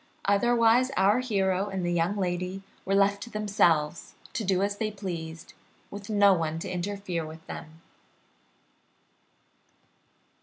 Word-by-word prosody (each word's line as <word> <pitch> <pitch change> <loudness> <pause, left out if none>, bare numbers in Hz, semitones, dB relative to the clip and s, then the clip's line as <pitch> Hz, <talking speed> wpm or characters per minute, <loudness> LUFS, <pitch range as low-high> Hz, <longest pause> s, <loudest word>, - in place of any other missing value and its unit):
Otherwise 235 +4 +4
our 200 +5 +4
hero 195 -5 0
and 190 -2 -3
the 175 - 0
young 175 +4 +1
lady 180 0 -2 0.2
were 195 - +1
left 200 0 +3
to - - -7
themselves, 175 -8 +1 0.2
to 225 - -2
do 190 -1 +1
as 200 0 -1
they 215 0 -1
pleased, 170 -6 -6 0.4
with 200 +1 -8
no 205 -2 +5
one 165 -3 -1
to 165 - -5
interfere 185 -1 -3
with 160 +1 -10
them. 160 +1 -9
195 Hz, 130 wpm, -28 LUFS, 175-205 Hz, 0.4 s, no